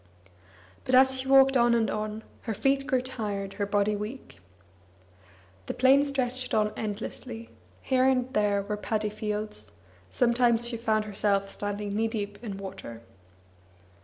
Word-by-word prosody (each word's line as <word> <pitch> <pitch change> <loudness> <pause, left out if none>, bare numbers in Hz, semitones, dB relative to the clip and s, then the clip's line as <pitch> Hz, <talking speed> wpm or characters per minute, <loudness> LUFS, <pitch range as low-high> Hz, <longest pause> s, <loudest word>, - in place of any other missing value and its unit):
But 255 - +2
as 265 0 +5
she 260 - -3
walked 270 0 +6
on 240 -1 +4
and 225 -1 +2
on, 215 +1 -3 0.2
her 225 -3 -4
feet 275 +4 +1
grew 260 -3 +1
tired, 205 -6 -4
her 200 - +1
body 205 +1 +1
weak. 210 +6 -7 1.3
The - - -3
plain 265 +3 +5
stretched 255 -2 -2
on 210 -1 +2
endlessly; 225 +2 -6 0.3
here 260 -1 +2
and 260 -1 +1
there 205 -2 +2
were 210 +1 -3
paddy 210 0 -2
fields; 210 - -5 0.4
sometimes 240 -1 +2
she 240 - -3
found 220 -2 0
herself 200 -1 0
standing 205 0 -4
knee 225 +1 +1
deep 205 -1 -5
in 205 -4 -5
water. 190 -13 -8
220 Hz, 145 wpm, -28 LUFS, 205-255 Hz, 1.3 s, walked